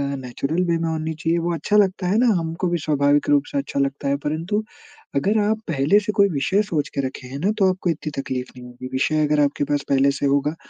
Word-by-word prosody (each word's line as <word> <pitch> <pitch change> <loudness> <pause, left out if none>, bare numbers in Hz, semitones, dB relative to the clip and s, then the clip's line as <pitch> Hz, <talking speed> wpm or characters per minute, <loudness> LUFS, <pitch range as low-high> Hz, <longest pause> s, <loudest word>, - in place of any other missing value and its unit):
Natural 135 +6 -2
way 170 -1 +1
में 165 - -1
होनी 160 0 -2
चाहिए। 165 +2 -1
वो 170 +1 -1
अच्छा 185 +7 +1
लगता 190 -2 +2
है 195 +4 +2
ना, 250 - +4
हमको 165 +2 -2
भी 175 - 0
स्वाभाविक 145 -1 +2
रूप 145 -1 +4
से - - -2
अच्छा 140 0 -3
लगता 140 +1 -1
है 140 - +1
परंतु, 165 +8 -1 0.5
अगर 200 +10 +2
आप 215 +1 +1
पहले 155 +6 +3
से 210 0 -3
कोई 200 -1 +4
विषय 170 +6 +1
सोच 160 -8 -2
के 140 - +1
रखे 130 -1 -6
हैं 135 +2 -7
न 205 - +3
तो 190 -2 +5
आपको 185 -1 -1
इतनी 155 -1 -3
तकलीफ़ 130 -1 -4
नहीं 125 - -10
होगी। 125 +1 -9
विषय 155 +4 +1
अगर 150 0 +1
आपके 145 0 +1
पास 145 0 -1
पहले 140 0 +4
से 140 +1 -3
होगा 140 +2 +1
155 Hz, 240 wpm, -22 LUFS, 140-180 Hz, 0.5 s, तो